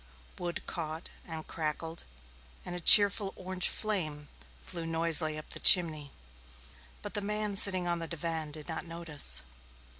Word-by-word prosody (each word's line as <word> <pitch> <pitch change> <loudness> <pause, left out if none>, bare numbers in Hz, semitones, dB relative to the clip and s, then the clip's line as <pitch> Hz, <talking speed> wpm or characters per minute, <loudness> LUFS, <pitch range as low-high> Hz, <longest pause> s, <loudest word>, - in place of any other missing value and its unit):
Wood 175 -1 -6
caught 160 -1 -7 0.2
and 160 -2 -8
crackled 160 +1 -6 0.6
and 180 - -7
a - - -6
cheerful 200 +2 +7
orange 185 0 0
flame 155 -9 -4 0.3
flew 165 - -6
noisily 165 -1 +1
up 155 - -12
the - - -7
chimney, 155 -5 +4 0.9
but - - -8
the 205 - -3
man 210 0 -3
sitting 185 -2 +3
on 170 0 -2
the 165 - -5
divan 165 -1 -5
did 150 0 -9
not 165 - -5
notice. 165 -3 +2
165 Hz, 145 wpm, -29 LUFS, 155-185 Hz, 0.9 s, cheerful